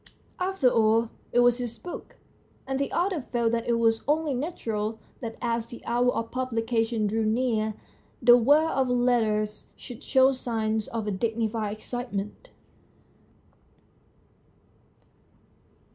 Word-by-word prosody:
After 365 -7 +1
all 225 -1 +3 0.2
it 245 - +4
was 245 0 +4
his 240 -2 -4
book, 355 - -9 0.5
and 270 0 -2
the 280 - -1
author 355 -2 0
felt 235 -2 0
that 230 -1 -1
it 235 -1 +2
was 225 -1 +2
only 300 0 +1
natural 225 -7 -3 0.2
that 225 -2 -6
as 230 -1 -1
the 240 0 -11
hour 245 +1 +2
of 230 -1 -3
publication 230 -3 -1
drew 220 +2 0
near 220 -1 0 0.4
the 240 +1 +7
world 290 +7 +4
of 265 -2 +1
letters 220 -4 +1
should 245 0 -10
show 265 -2 +4
signs 220 -4 -2
of 225 -2 -4
a 210 - -1
dignified 220 0 -1
excitement. 240 - -5
235 Hz, 130 wpm, -27 LUFS, 220-255 Hz, 0.5 s, the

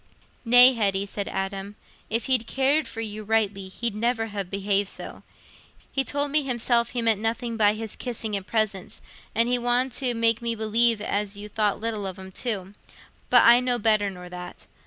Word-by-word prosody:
"Nay, 245 +2 +8
Hetty," 200 -4 0
said 200 0 -5
Adam, 195 +1 -4 0.3
"if 225 +1 -1
he'd 250 -4 +1
cared 275 +3 +1
for 225 - -6
you 215 -1 -5
rightly, 205 -3 0
he'd 230 +4 -3
never 225 +1 0
ha' 200 -3 -5
behaved 200 0 0
so. - - -9 0.7
He 270 - 0
told 285 +1 -2
me 305 +1 +4
himself 240 -3 0
he 240 -2 -3
meant 220 -3 +2
nothing 230 +1 -2
by 210 -1 +3
his 220 -1 -6
kissing 225 -4 -4
and 195 0 -5
presents, 215 -4 -1 0.4
and 230 +2 +3
he 245 0 +1
wanted 245 +2 +1
to 250 -3 0
make 230 0 +2
me 235 -1 -1
believe 225 0 +2
as 205 -1 -2
you 205 +1 -7
thought 210 -1 -1
light 230 0 -1
of 195 -3 -4
'em 190 0 -10
too. 195 -3 -4 0.6
But - - +6
I 235 +1 +7
know 250 -1 0
better 215 -2 +2
nor 180 -2 -10
that. 180 0 -9
220 Hz, 190 wpm, -25 LUFS, 200-240 Hz, 0.7 s, Nay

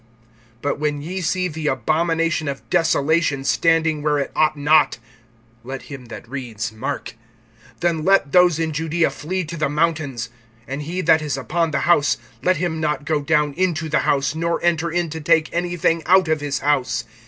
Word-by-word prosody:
(14)But 145 0 -1
when 145 -1 -1
ye 185 +4 -4
see 185 +2 0
the 160 -2 -4
abomination 160 +4 0
of 140 -1 -5
desolation 160 -3 +2
standing 160 0 +2
where 150 0 +1
it 140 - -2
ought 155 -1 +2
not, 150 +1 +3 0.7
(let 135 +2 -6
him 135 -3 -9
that 115 0 -10
reads, 115 -5 -5
mark!) 110 +4 -5 0.7
then 170 -3 0
let 195 -6 +3
those 180 -2 +5
in 165 -1 -1
Judaea 165 0 0
flee 180 +6 -3
to 155 - -7
the 155 - 0
mountains. 145 -6 -1 0.4
(15)And 135 +2 -4
he 170 +5 -3
that 160 -2 +4
is 145 -4 -2
upon 165 +5 -1
the - - -1
house, 165 -4 +3 0.2
let 185 0 +2
him 165 -1 -2
not 150 -1 -1
go 150 0 0
down 150 -1 +1
into 165 -2 -1
the 150 - +2
house, 135 0 +1
nor 170 +1 -1
enter 170 -1 +1
in 170 -1 -1
to 160 0 -5
take 160 0 +2
anything 175 -1 0
out 185 0 +5
of 155 -1 0
his 145 -1 -2
house. 130 -5 +1
155 Hz, 180 wpm, -21 LUFS, 145-170 Hz, 0.7 s, those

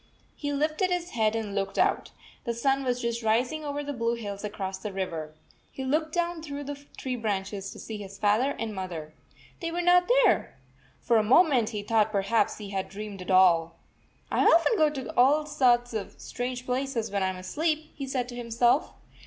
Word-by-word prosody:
He 290 -1 -3
lifted 310 +6 0
his 355 -1 -2
head 220 -1 +1
and 215 -3 -3
looked 195 -1 -2
out. - - +2 0.4
The 235 -1 -2
sun 270 +3 +1
was 250 -1 -1
just 235 0 -1
rising 245 +8 +1
over 290 0 -3
the 285 0 -4
blue 230 -1 0
hills 205 -3 -6
across 195 -2 -4
the 205 +2 -5
river. 165 -5 -4 0.4
He 265 - -6
looked 310 +4 0
down 345 0 -1
through 290 -2 -6
the 285 0 -7
tree 255 -1 -3
branches 200 -3 -3
to - - -10
see 220 - -6
his 195 -1 -9
father 215 +8 +2
and 225 -1 -3
mother. 170 -5 -6 0.5
They 335 - -3
were 350 +1 -2
not 355 +2 +5
there! 370 - +2 0.4
For 235 - +3
a 215 - +3
moment 255 -1 +4
he 210 -3 -4
69 - - -14 0.2
thought 215 - -11
perhaps 210 +1 +1
he 205 -2 -8
had 190 -1 -3
dreamed 205 -1 -7
it 180 - -8
all. 170 -3 +4 0.6
"I - - +2
often 335 +7 +5
go 310 -6 +4
to 270 -4 -6
all 285 +5 +4
sorts 245 -5 +2
of 215 -3 -5
strange 250 0 -4
places 250 -4 -2
when 200 -1 0
I 190 - +2
am 185 0 -3
asleep," 310 - -2
he 275 -2 -6
said 255 -2 -2
to 240 - -7
himself. 240 +3 +1
235 Hz, 200 wpm, -27 LUFS, 205-285 Hz, 0.6 s, not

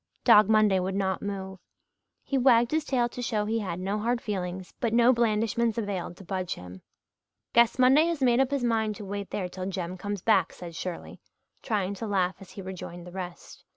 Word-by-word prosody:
Dog 210 0 +7
Monday 215 -3 +4
would 190 +1 -2
not 190 -1 -1
move. 190 -2 -5 0.6
He 275 - -3
wagged 240 -3 +4
his 315 0 +1
tail 245 -4 +1
to 245 - -7
show 215 -4 -1
he 225 +2 0
had 180 -5 -4
no 195 +3 -2
hard 235 +3 0
feelings 185 -4 -4
but 230 -1 0
no 240 +2 +6
blandishments 230 0 +1
availed 195 -5 -3
to - - -12
budge 185 -1 -3
him. 90 +1 -11 0.7
"Guess 235 +1 +4
Monday 260 +5 +5
has 335 -3 -1
made 250 -2 +3
up 265 -1 +3
his 280 -3 -1
mind 220 -3 +1
to 205 - -8
wait 200 0 -5
there 185 -3 -3
till 185 +1 -6
Jem 185 -1 -4
comes 205 -1 -4
back," 195 -6 +3
said 175 -2 -9
Shirley, 180 0 -6 0.4
trying 200 -5 -1
to 220 +3 -5
laugh 185 -3 0
as 195 - -13
he 195 - -9
rejoined 175 -2 -8
the 180 - -10
rest. 180 -1 -8
205 Hz, 205 wpm, -27 LUFS, 185-235 Hz, 0.7 s, Dog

